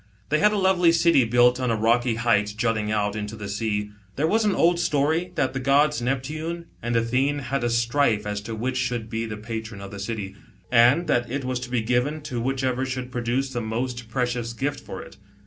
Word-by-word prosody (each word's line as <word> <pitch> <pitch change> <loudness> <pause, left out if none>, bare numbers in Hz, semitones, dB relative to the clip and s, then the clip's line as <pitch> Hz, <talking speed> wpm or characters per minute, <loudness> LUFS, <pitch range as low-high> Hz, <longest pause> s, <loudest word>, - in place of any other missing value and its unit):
They 155 - +2
had 210 +1 +5
a 210 - 0
lovely 190 -3 +4
city 165 -6 +4
built 120 +2 +4
on 125 -1 0
a 115 - +2
,rocky 115 +2 +2
height 115 -3 +2
l - - -7
jutting 110 -2 0
out 105 -1 0
Into 105 0 -4
the 105 -2 -7
spa. 105 0 -2 0.2
There 145 - +1
was 220 +7 +2
an 205 - +2
old 170 +1 +3
story 160 +3 +1
that 130 -2 0
the 135 - -2
gods'Npptune 150 +4 0 0.2
and 120 0 -2
Athene 130 +5 +1
had 135 -2 -2
a 120 - +1
strife 115 -2 +1
as 105 0 -3
to 110 +2 -6
which 125 +4 -2
should 120 -3 -2
be 115 0 -2
the 105 -1 -5
patron 110 -1 -6
of 100 0 -8
the 100 - -8
city, 100 -2 -4 0.4
and 125 +8 +5
that 120 -6 +1
it 135 +1 -3
was 130 -1 -1
to 125 0 -7
be 120 -2 0
given 125 +6 0
to 125 -5 -4
whichever 130 0 -1
should 130 -1 -4
produce 125 +2 -1
the 120 -2 -2
most 120 +1 -3
precious 120 -1 -2
gift 140 +4 -2
for - - -8
it. - - -14
125 Hz, 215 wpm, -24 LUFS, 115-140 Hz, 0.4 s, had